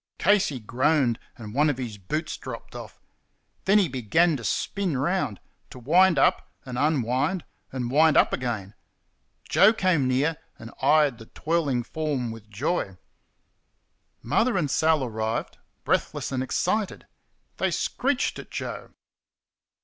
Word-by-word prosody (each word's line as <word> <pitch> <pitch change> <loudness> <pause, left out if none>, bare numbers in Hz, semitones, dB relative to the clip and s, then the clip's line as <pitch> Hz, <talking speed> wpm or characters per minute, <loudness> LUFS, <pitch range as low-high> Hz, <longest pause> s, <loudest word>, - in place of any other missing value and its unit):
Casey 195 -10 +2
groaned, 125 +2 +1 0.2
and 105 -3 -9
one 150 +4 +3
of 145 - -1
his 115 -5 -6
boots 155 - -3
dropped - - -9
off. - - -9 0.7
Then 200 +2 +5
he 200 -4 +4
began 150 +6 +2
to 120 - -6
spin 180 - -1
round 145 - -1 0.3
to - - -11
wind 170 +8 +4
up - - +2 0.2
and 125 -2 -6
unwind 145 +4 0 0.3
and 125 -2 -3
wind 155 +2 +5
up - - +4
again. 110 -6 -3 0.7
Joe 215 +3 +5
came 185 - +1
near 140 +5 +1 0.2
and 110 +1 -10
eyed 145 -2 +3
the 115 - -12
twirling 150 -6 -1
form 140 -4 -3
with 110 -1 -11
joy. 110 - -2 1.3
Mother 235 -2 +1
and 150 -7 0
Sal 155 -1 +2
arrived, 110 -2 -3 0.2
breathless - - -1
and 130 -1 -1
excited. 185 +10 -1 0.5
They - - +1
screeched 270 +1 -1
at - - -10
Joe. - - -6
140 Hz, 135 wpm, -25 LUFS, 120-165 Hz, 1.3 s, Then